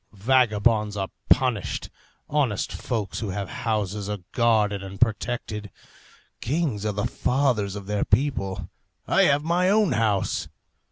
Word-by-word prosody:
Vagabonds 105 -2 +2
are 95 -1 -2 0.2
punished, 125 -7 +1 0.4
honest 135 -9 0
folks 110 -5 -3
who 110 - -3
have 95 0 -4 0.2
houses 105 -1 -1
are 105 - -2
guarded 110 -4 +2
and 95 0 -8
protected. 110 -2 -1 0.7
Kings 130 -7 -1
are - - +1
the 100 +1 -1
fathers 125 -7 0
of 100 -1 -7
their 105 0 0
people. 110 -9 0 0.4
I - - +4
have 145 +1 +3
my 175 +3 +2
own 210 -4 +3
house. 110 -4 0
110 Hz, 130 wpm, -25 LUFS, 100-130 Hz, 0.7 s, I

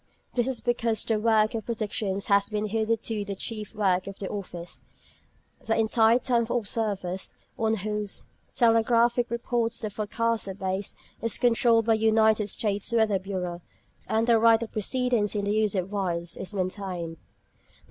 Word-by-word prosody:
This 245 0 +1
is 265 -3 -2
because 235 -2 0
the 220 -2 +1
work 215 -1 +3
of 225 -2 -4
predictions 210 -3 -2
has 200 0 +3
been 210 -1 -1
hitherto 220 0 -1
the 200 -1 -5
chief 215 +1 -5
work 190 -3 +1
of 195 - -7
the 195 - -5
Office: 180 -4 -6 0.8
the 225 - 0
entire 225 +1 +4
time 245 -2 +1
of 230 - -2
the 240 - -2
observers, 200 -5 -2 0.2
on 225 -2 +1
whose 210 0 -3 0.3
telegraphic 235 +1 +3
reports 235 -1 -1
the 215 -2 -4
forecasts 225 +2 -1
are 190 - -5
based, 190 0 -3 0.3
is 230 -1 0
controlled 235 -2 +3
by 225 -1 +4
the - - -7
United 220 -1 +4
States 205 +1 -1
Weather 220 -4 +3
Bureau; 180 -2 -4 0.5
and 220 +1 +1
the 230 -1 +4
right 230 0 +5
of 225 - -7
precedence 230 -1 0
in 205 -1 -1
the 200 - 0
use 215 -2 +1
of 185 +1 -2
wires 175 -4 -2
is 190 - -6
maintained. 185 -4 -4
215 Hz, 170 wpm, -27 LUFS, 200-230 Hz, 0.8 s, right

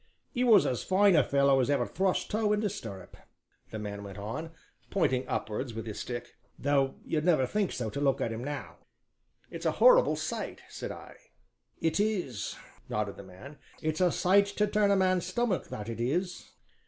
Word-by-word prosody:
"He 250 - 0
was 220 -6 +6
as 125 - -1
fine 195 0 +4
a 150 - +6
fellow 140 0 +3
as 130 - +1
ever 145 - +2
thrust 190 +1 -1
toe 210 0 +2
into 210 -1 0
stirrup," 100 - -8 0.5
the 110 - -6
man 100 -1 -5
went 100 0 -9
on, 110 +11 -5 0.4
pointing 130 -9 +1
upwards 115 +2 -3
with 115 -1 -5
his 110 -2 -6
stick, 120 -1 -6 0.2
"though 140 -1 +1
you'd 155 -2 -1
never 155 -6 +3
think 200 +8 -1
so 115 -4 -3
to 140 - -4
look 135 -2 +2
at 115 - -1
him 115 +2 -5
now!" 145 +1 -6 0.7
"It's - - -3
a - - +1
horrible - - +6
sight!" - - -4
said - - -6
I. - - -11 0.6
"It 165 +3 0
is," 180 - -1 0.3
nodded 105 -2 -2
the - - -10
man, 95 +11 -12 0.2
"it's 155 +2 -2
a 180 -1 +4
sight 200 +4 +4
to 210 +1 0
turn 210 0 +2
a 200 - +4
man's 185 -2 +2
stomach, 190 - -1
that 105 0 -6
it 115 -1 -5
is!" 175 +9 -2
145 Hz, 190 wpm, -30 LUFS, 115-195 Hz, 0.7 s, was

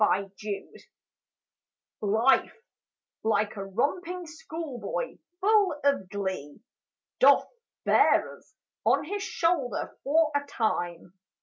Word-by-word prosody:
LIFE 195 -2 +2 1.7
Life, 220 +5 +3 0.7
like 215 -1 +1
a 200 - -4
romping 340 - -2
schoolboy, 325 - -5 0.2
full 405 -4 +4
of 280 -10 +2
glee, 190 -7 -4 0.6
Doth - - +6 0.4
bear - - +4
us - - -23 0.3
on - - +3
his 405 +7 -4
shoulder 330 -9 -1
for 310 +2 +3
a 285 - +1
time. 175 -9 -2
275 Hz, 95 wpm, -28 LUFS, 200-335 Hz, 1.7 s, Doth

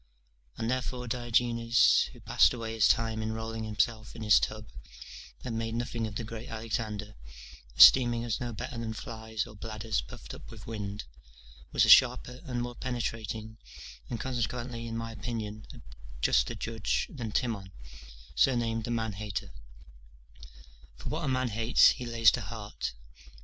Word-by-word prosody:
And 115 +1 -1
therefore 125 -1 -3
Diogenes, 120 -1 +3
who - - -15
passed - - +4
away 115 -2 -5
his 110 -2 +4
time 110 -1 +1
in 110 0 -2
rolling 110 0 -4
himself 110 +1 -1
in 115 - -6
his 105 - +6
tub, 110 0 -3 0.8
and 115 -2 -3
made 115 0 -3
nothing 120 -1 -2
of 105 - -8
the 115 - -3
great 115 +1 -7
Alexander, 110 -2 -4 0.6
esteeming 120 -2 +8
us 115 -2 -1
no 120 -1 -3
better 120 +2 -6
than 115 -1 -3
flies 110 -1 -4
or 110 - -12
bladders 110 0 -3
puffed - - -10
up - - -11
with 110 -3 -11
wind, 105 -2 -5 0.7
was - - +4
a - - +1
sharper 125 +1 +6
and 125 -3 -2
more 120 0 -5
penetrating, 115 -3 -4 0.5
and, 120 - -3
consequently 120 -1 -3
in 115 0 -4
my 115 0 -4
opinion, 110 -1 -5
a - - -12 0.4
juster - - +2
judge 115 -2 -1
than 120 -7 -5
Timon, 105 -5 -2 0.6
surnamed 115 - +2
the - - -5
Man 110 -2 -1
hater; 100 0 -5 1.4
for - - -7
what 155 +1 -2
a - - -1
man 130 -1 +1
hates 115 +3 +5
he 125 - -3
lays 115 -1 +5
to - - -2
heart. 105 - -5
115 Hz, 160 wpm, -30 LUFS, 110-120 Hz, 1.4 s, esteeming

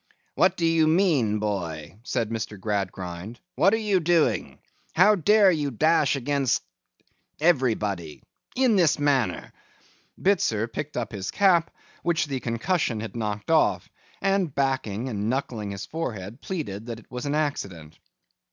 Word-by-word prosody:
'What - - +3
do 170 - 0
you 165 -1 +3
mean, 155 - +3
boy?' 95 -5 -4
said 115 -1 -2
Mr. 110 -2 -4
Gradgrind. 95 0 -4
'What 195 - +4
are - - 0
you 210 -4 +1
doing? 170 -1 +1 0.4
How 210 - +6
dare 205 +1 +5
you 150 -4 -1
dash 150 +3 +2
against—everybody—in 130 - -2
this 170 -5 +4
manner?' 145 -5 0 0.7
Bitzer 115 - +1
picked 150 +4 -5
up 120 -2 -3
his 100 -3 -5
cap, 180 -5 +3 0.3
which 170 -1 +1
the 135 -3 -3
concussion 120 +1 -1
had 115 +2 -6
knocked 105 +1 -3
off; 160 -1 +2 0.3
and 195 -6 +1
backing, 130 -5 -1
and 105 -3 -2
knuckling 120 -5 -2
his 100 -1 -5
forehead, 115 - -5
pleaded 115 - -5
that 115 -2 -5
it 115 - -21
was 125 +2 -4
an 145 - 0
accident. 95 - -3
130 Hz, 135 wpm, -25 LUFS, 105-165 Hz, 0.7 s, How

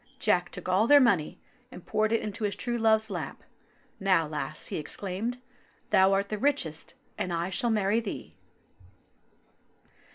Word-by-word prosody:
Jack 175 -1 +1
took 180 - -9
all 190 +5 +3
their 290 +2 +8
money 200 - +2 0.3
and 180 - -11
poured 215 0 0
it 230 - +2
into 215 +1 -5
his 205 -1 0
true 240 +5 -3
love's 220 -1 +3
lap. 180 - -5 0.6
"Now, 185 -5 +3
lass," 150 0 -4
he - - -3
exclaimed, 200 +9 -3 0.5
"thou 190 +1 +5
art 200 +1 0
the 215 - -3
richest, 225 - -1 0.2
and 180 - -2
I 170 +2 -2
shall 235 +6 +1
marry 210 0 +2
thee." 220 -4 -6
200 Hz, 155 wpm, -28 LUFS, 180-225 Hz, 0.6 s, their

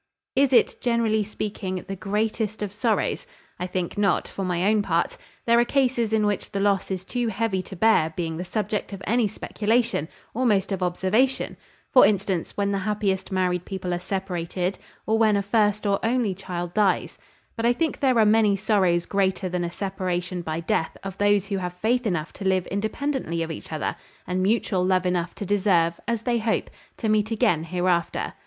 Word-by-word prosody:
"Is 275 0 +4
it, 250 - +3
generally 230 -3 +2
speaking, 200 -3 -4
the 195 - -4
greatest 215 +2 -1
of 200 -2 -4
sorrows? 235 - 0 0.3
I 180 - -2
think 180 +2 -3
not, 200 -3 +2
for 195 - -5
my 180 -1 0
own 215 0 +4
part. 170 -4 0 0.3
There 235 0 +5
are - - +6
cases 245 -3 +1
in 220 -1 +2
which 205 -1 -1
the 200 - -1
loss 200 -1 +1
is 185 -1 -3
too 245 +2 -1
heavy 220 -2 0
to 190 - -10
bear 175 -5 +3
being 165 -2 -3
the 175 - -3
subject 210 +2 -2
of 195 -1 -7
any 230 +1 +2
speculation, 225 -3 0 0.3
almost 210 -5 +1
of 190 -1 -2
observation; 190 +9 +1 0.4
for 255 - +8
instance, 195 -3 +1
when 200 0 +1
the 200 - 0
happiest 195 -2 -1
married 180 -2 0
people 185 -2 -4
are 175 - -1
separated, 180 -1 -3 0.3
or 220 +1 +2
when 215 -2 +4
a 200 - 0
first 210 0 +1
or 200 -1 +1
only 230 -3 +1
child 175 -2 -5
dies: 205 -3 +1 0.4
but 225 - -4
I - - +5
think 320 +6 -1
there 260 -3 +3
are 220 - +6
many 210 -1 +4
sorrows 190 -4 +2
greater 190 -1 0
than 180 0 -1
a 170 - -3
separation 180 -2 -3
by 160 0 -3
death 160 0 -1
of 195 -1 -5
those 205 -1 +3
who 200 -1 -2
have 180 -1 -3
faith 235 +6 +1
enough 170 -5 -2
to - - -8
live 190 -2 +2
independently 215 - -2
of 165 - -4
each 160 - -8
other, 155 - -2 0.3
and 185 +1 -1
mutual 195 -2 +1
love 185 0 +2
enough 175 -1 -1
to 205 - -5
deserve, 180 -4 +2
as 230 -1 -1
they 240 -1 +1
hope, 220 0 -1 0.3
to 225 - -2
meet 215 0 +2
again 175 -8 +2
hereafter. 175 -1 0
200 Hz, 190 wpm, -25 LUFS, 180-220 Hz, 0.4 s, for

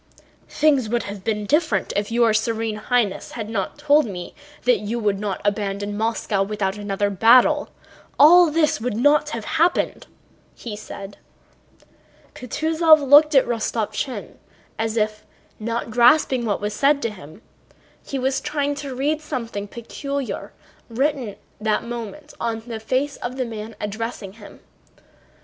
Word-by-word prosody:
"Things 280 -7 +2
would 240 +1 0
have 200 -1 -7
been 210 -1 -1
different 290 - +1
if 205 +2 -1
your 230 -1 +3
Serene 225 0 -1
Highness 215 -2 -1
had 220 -2 -5
not 195 -4 -3
told 295 -2 +3
me 180 -4 -7 0.3
that 245 -4 +3
you 210 +4 -3
would 205 -4 0
not 205 -2 -3
abandon 205 0 -1
Moscow 220 -2 -1
without 195 -1 -1
another 205 -1 -2
battle; 250 +9 +5 0.5
all 340 +4 +8
this 305 -6 +1
would 235 -2 -2
not 290 +4 +3
have 230 -7 -5
happened," 330 +2 0 0.5
he 225 -3 -7
said. 200 -1 -9 1.1
Kutúzov 315 +3 +3
looked 295 +2 +7
at 270 - +6
Rostopchín 235 +2 -3 0.4
as 225 0 -1
if, 215 0 -1 0.4
not 230 +1 -3
grasping 245 +1 +4
what 205 -3 -1
was 210 0 -2
said 280 +5 +3
to 230 - -1
him, 170 0 -13 0.6
he 275 - -4
was 265 +1 0
trying 290 -1 -1
to 280 -2 -6
read 295 +4 0
something 235 -9 -5
peculiar 275 +5 -5 0.4
written 270 +1 0
at 200 - -11 0.2
that 215 0 0
moment 240 +5 -7
on 230 -1 -2
the 230 -2 -6
face 260 +6 -1
of 250 +2 -5
the 255 - -1
man 220 -1 -7
addressing 210 -1 -5
him. 210 -1 -14
230 Hz, 145 wpm, -22 LUFS, 210-275 Hz, 1.1 s, all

